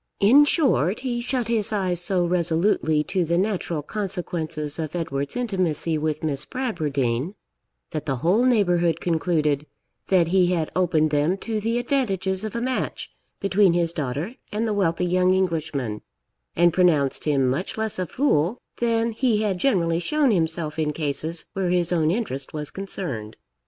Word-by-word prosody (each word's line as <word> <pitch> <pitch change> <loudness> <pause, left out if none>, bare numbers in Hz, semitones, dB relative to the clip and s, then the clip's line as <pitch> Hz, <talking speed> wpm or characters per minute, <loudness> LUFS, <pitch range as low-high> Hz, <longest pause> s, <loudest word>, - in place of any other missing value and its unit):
In 260 +9 +7
short, 250 - +2
he 245 -2 -2
shut 245 -1 -1
his 225 -3 +2
eyes 185 -4 0
so 180 0 +2
resolutely 170 -2 +1
to 185 +3 -1
the 170 +1 0
natural 180 -5 -1
consequences 165 -6 -3
of 155 +1 -4
Edward's 140 -5 -3
intimacy 185 -9 -1
with 155 0 -2
Miss 145 -2 -1
Bradwardine, 150 - -2 0.6
that 155 - -4
the 135 - 0
whole 180 - +2
neighbourhood 175 - +2
concluded 155 -3 0 0.4
that 175 -4 +3
he 185 0 +4
had 160 -3 -1
opened 160 -4 +2
them 150 +5 +1
to 220 -2 -1
the 230 +2 0
advantages 195 -7 -1
of 215 0 -5
a 235 - -1
match 255 +1 -3 0.3
between 195 -2 +3
his 170 -1 +1
daughter 150 - -3 0.2
and 220 +2 -1
the 215 - 0
wealthy 180 -3 +1
young 180 +1 +3
Englishman, 155 - -2 0.5
and 175 0 +4
pronounced 160 -7 +2
him 140 -4 +2
much 140 +13 -2
less 220 -3 -1
a 185 - -1
fool 215 - +1 0.2
than 230 -1 +1
he 225 -2 +1
had 195 -4 -1
generally 170 -8 +2
shown 285 - +2
himself 160 -4 -1
in 150 -1 0
cases 155 +2 -2
where 190 -2 -1
his 175 -1 +1
own 160 -3 +2
interest 165 - -3
was 150 -1 -4
concerned. 165 - -5
175 Hz, 160 wpm, -24 LUFS, 155-210 Hz, 0.6 s, In